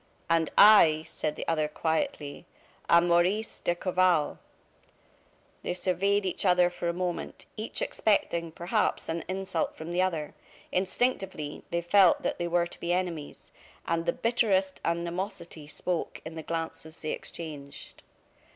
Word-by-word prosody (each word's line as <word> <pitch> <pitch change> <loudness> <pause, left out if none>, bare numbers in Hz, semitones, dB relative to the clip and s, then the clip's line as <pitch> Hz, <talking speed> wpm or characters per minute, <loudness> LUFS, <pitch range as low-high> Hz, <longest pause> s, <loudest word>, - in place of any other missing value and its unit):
"And 165 -1 +2
I," 165 -7 +8
said 150 -1 -3
the - - -6
other, 155 -2 +1
quietly, 160 0 -2 0.4
"am 170 +1 +6
Maurice 180 +6 +2
d'Escorval." 175 -2 +1 1.2
They 180 - -3
surveyed 195 +3 +1
each 185 - -1
other 180 -2 +4
for 175 -1 -3
a - - +2
moment; 175 0 -4
each 215 +2 -3
expecting, 170 -6 0
perhaps, 175 +5 -1
an 165 0 -2
insult 190 -3 -2
from 160 +2 -6
the 175 +1 +1
other. 165 -5 -1 0.4
Instinctively, 190 -5 -1
they 170 0 -1
felt 180 +1 +5
that - - -2
they 175 - -1
were 170 0 +2
to 175 - -10
be 170 - -2
enemies; 175 -5 -3 0.3
and 165 0 -1
the - - +4
bitterest 205 -5 +1
animosity 170 -1 -3
spoke 175 +3 -3
in 160 - -6
the 160 - -6
glances 160 0 -5
they 155 - -3
exchanged. 145 -4 -7
175 Hz, 140 wpm, -28 LUFS, 165-185 Hz, 1.2 s, I